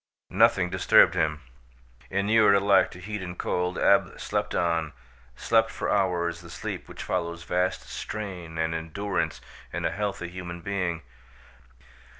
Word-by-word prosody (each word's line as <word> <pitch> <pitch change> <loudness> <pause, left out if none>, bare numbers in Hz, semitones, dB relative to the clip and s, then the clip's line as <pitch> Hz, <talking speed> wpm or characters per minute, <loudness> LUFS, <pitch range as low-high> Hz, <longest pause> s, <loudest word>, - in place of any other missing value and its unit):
Nothing 90 -2 +4
disturbed 95 -1 +5
him. 80 -1 0 0.7
Inured 100 +2 +4
alike 100 0 +4
to 90 - -12
heat 105 +2 -5
and 90 -1 -6
cold, 90 0 -1
Ab - - +3
slept - - -2
on, 85 -3 0 0.4
slept 110 - +2
for - - -3
hours 85 -4 0
the 85 - -12
sleep - - -6
which - - -7
follows 85 0 -2
vast 90 -6 0
strain 90 +1 -6
and 80 0 0
endurance 80 +5 -2 0.3
in 85 +1 -3
a 80 - +1
healthy 100 -2 -3
human 85 -1 -7
being. 90 -3 -2
90 Hz, 140 wpm, -26 LUFS, 85-100 Hz, 0.7 s, disturbed